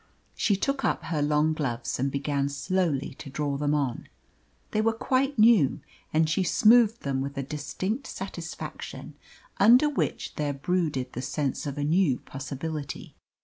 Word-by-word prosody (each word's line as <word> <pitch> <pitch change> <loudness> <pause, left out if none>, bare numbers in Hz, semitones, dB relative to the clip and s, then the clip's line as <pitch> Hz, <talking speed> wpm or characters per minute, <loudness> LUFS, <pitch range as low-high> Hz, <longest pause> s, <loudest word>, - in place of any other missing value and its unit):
She 205 - +2
took 275 +7 -1
up - - 0
her 160 -3 -2
long 150 +2 +2
gloves 125 -7 -3
and 135 +1 0
began 140 0 -1
slowly 145 -1 -1
to 140 - -8
draw 145 0 -2
them 145 +1 +1
on. 135 -5 -2 0.6
They 215 - +1
were 225 +1 +2
quite 260 +4 0
new, 215 - +5 0.3
and 160 +1 +3
she 155 +5 +1
smoothed 225 +5 +5
them 135 -1 -1
with 140 +1 -5
a 140 - -1
distinct 185 - -4
satisfaction, 175 -3 -7 0.5
under 245 +8 +7
which 295 - -2
there 145 -1 0
brooded 140 -4 -1
the 125 - -4
sense 140 +2 -2
of 140 0 -4
a 145 - -1
new 155 -3 +3
possibility. 140 +2 -6
150 Hz, 155 wpm, -27 LUFS, 140-195 Hz, 0.6 s, under